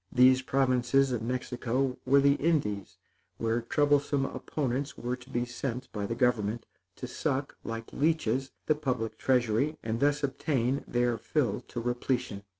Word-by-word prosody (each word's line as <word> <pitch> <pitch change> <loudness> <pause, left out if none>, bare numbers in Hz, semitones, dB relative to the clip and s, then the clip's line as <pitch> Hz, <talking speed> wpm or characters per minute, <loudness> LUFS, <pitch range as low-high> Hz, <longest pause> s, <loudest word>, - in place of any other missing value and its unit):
These 130 +1 +6
provinces 130 0 +2
of 120 -3 -1
Mexico 125 +1 -1
were 140 +2 +6
the 140 0 +5
Indies 140 - 0 0.4
where 115 +1 0
troublesome 145 +2 +2
opponents 135 0 -3
were 125 +1 -2
to 125 +1 -16
be 120 -2 -1
sent 125 +1 -5
by 100 -2 -3
government, 115 -2 0 0.3
to - - -6
suck, 135 +2 -2
like 115 0 -6
leeches, 135 -4 +1 0.2
the 155 - +4
public 130 -7 -2
treasury, 125 +3 +2
and 115 0 -2
thus 145 +2 +2
obtain 135 -1 0
their 120 -1 +1
fill 150 -6 0
to 120 - -5
repletion. 120 -2 -1
125 Hz, 145 wpm, -29 LUFS, 120-140 Hz, 0.4 s, These